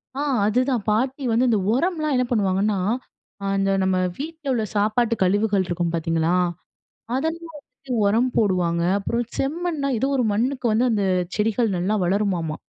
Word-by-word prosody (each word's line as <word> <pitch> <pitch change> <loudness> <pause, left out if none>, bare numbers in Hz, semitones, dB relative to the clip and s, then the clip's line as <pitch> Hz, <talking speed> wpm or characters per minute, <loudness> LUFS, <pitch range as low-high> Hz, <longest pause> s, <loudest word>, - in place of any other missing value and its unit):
ஆ, - - -4 0.3
அதுதான். 250 +1 +1
பாட்டி 260 +6 0
வந்து 245 +3 +3
இந்த 220 -3 +2
உரம்லாம் 310 +1 0
என்ன 250 - +2
பண்ணுவாங்கன்னா, 200 -1 +1 0.7
ஆ - - -3
இந்த 195 0 +1
நம்ம 190 0 +1 0.2
வீட்ல 315 +1 -7
உள்ள 225 -3 0
சாப்பாட்டு 220 +3 +2
கழிவுகள் 205 0 +2
இருக்கும் 175 -1 -1
பார்த்தீங்களா, 165 +1 0 0.8
அதெல்லாம் 325 +3 -3
வந்துட்டு 265 -1 -14
உரம் 230 +5 +2
போடுவாங்க. 180 -5 +1 0.2
அப்புறம் 235 +4 -2
செம்மண்னா 305 0 -1
ஏதோ 270 - 0
ஒரு 250 - +2
மண்ணுக்கு 255 +4 -1
வந்து 230 +4 +2
அந்த 205 -2 +1 0.3
செடிகள் 220 +1 +1
நல்லா 190 +5 0
வளருமாமா. 180 -4 0
220 Hz, 145 wpm, -23 LUFS, 195-265 Hz, 0.8 s, வந்து